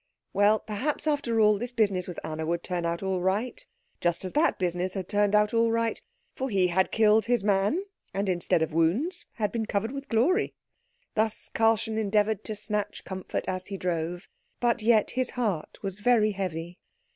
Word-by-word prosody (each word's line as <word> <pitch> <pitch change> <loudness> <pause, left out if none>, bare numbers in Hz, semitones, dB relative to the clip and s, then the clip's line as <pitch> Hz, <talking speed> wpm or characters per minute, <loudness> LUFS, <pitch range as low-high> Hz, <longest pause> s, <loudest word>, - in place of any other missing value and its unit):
Well, 205 +2 +4
perhaps 220 +10 -3
after 280 -7 +1
all, 210 -1 +5
this 245 +2 -3
business 200 -6 +1
with 180 - -6
Anna 160 0 -4
would 170 +2 -1
turn 175 -2 -2
out 170 +2 -2
all 190 -1 -1
right, 205 +7 -1 0.4
just 175 +1 0
as 185 - -5
that 305 +3 +3
business 180 +1 -1
had 190 -2 -3
turned 205 0 +2
out 210 +1 +3
all 230 0 +3
right; 230 0 0 0.3
for 265 0 -3
he 190 -4 +2
had 190 +2 +2
killed 220 0 +4
his 240 -2 +1
man, 205 - +2 0.3
and, 200 +1 -2
instead 175 -2 +1
of 160 - -3
wounds, 180 - +1
had 210 -3 -1
been 225 -1 -2
covered 215 +3 -1
with 275 0 -7
glory. 330 - +2 0.6
Thus 220 0 0
Karlchen 225 0 +2
endeavoured 210 0 +1
to 215 - -4
snatch 210 0 -3
comfort 190 -1 -4
as 185 0 -3
he 195 - -5
drove, 175 -1 -2 0.3
but 240 -1 +1
yet 220 -1 +3
his 255 -1 0
heart 205 -10 -1
was 195 0 -3
very 220 -1 +4
heavy. 175 -3 -4
210 Hz, 185 wpm, -27 LUFS, 185-230 Hz, 0.6 s, all